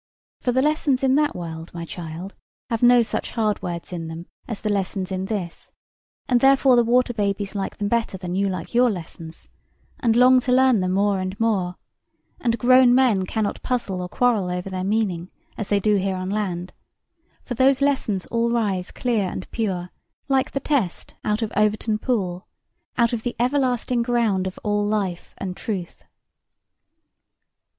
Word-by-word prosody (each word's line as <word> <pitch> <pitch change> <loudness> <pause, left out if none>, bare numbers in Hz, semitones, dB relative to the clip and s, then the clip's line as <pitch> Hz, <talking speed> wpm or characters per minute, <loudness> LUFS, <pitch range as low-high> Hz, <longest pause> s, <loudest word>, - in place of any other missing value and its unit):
For 250 - 0
the 260 +2 +2
lessons 295 -3 +1
in 265 -1 +4
that 300 0 +1
world, 165 -1 -7
my 170 -1 -5
child, 170 +3 -7 0.4
have 230 - -1
no 245 0 +6
such 225 - -3
hard 215 -3 0
words 170 0 -5
in 165 -2 -4
them 165 +1 -7 0.2
as 225 -4 -4
the 215 - -1
lessons 190 -1 -2
in 190 0 -2
this, 190 -5 -5 0.6
and 245 -1 +3
therefore 270 0 +5
the 240 - +5
water 245 +1 +2
babies 200 -2 -1
like 195 -2 -4
them 205 - -1
better 230 -3 0
than 180 -1 -5
you 195 +1 +1
like 185 -3 -5
your 245 +1 +5
lessons, 165 -4 -8 0.5
and 230 -5 +2
long 255 +1 +6
to 250 0 -2
learn 260 -3 +5
them 185 0 0
more 200 0 +2
and 185 +1 -4
more; 195 -6 0 0.6
and 235 -1 0
grown 250 +1 +6
men 225 -8 +3
cannot 215 0 -2
puzzle 235 -7 -2
nor 180 0 -4
quarrel 225 -6 +1
over 180 +2 -4
their 185 0 -3
meaning, 190 -4 -1 0.3
as 215 - -4
they 205 - +2
do 210 +1 +2
here 190 0 -1
on 185 +1 -4
land; 185 -4 -3 0.7
for 245 - -4
those 260 +2 +3
lessons 265 -9 0
all 235 0 +1
rise 205 -6 0
clear 230 -5 0
and 185 - -7
pure, 185 -6 -2 0.4
like 270 -1 +2
the 275 - -2
Test 265 - -1
out 210 +2 0
of 215 - -4
Overton 215 +1 +1
Pool, 190 -7 -2 0.5
out 235 -1 +3
of 230 - -1
the 245 +1 -3
everlasting 250 -1 +1
ground 230 -6 +1
of 185 - -6
all 205 -1 +1
life 205 -4 -2
and 185 -2 -5
truth. 190 -6 -5
210 Hz, 175 wpm, -23 LUFS, 185-245 Hz, 0.7 s, no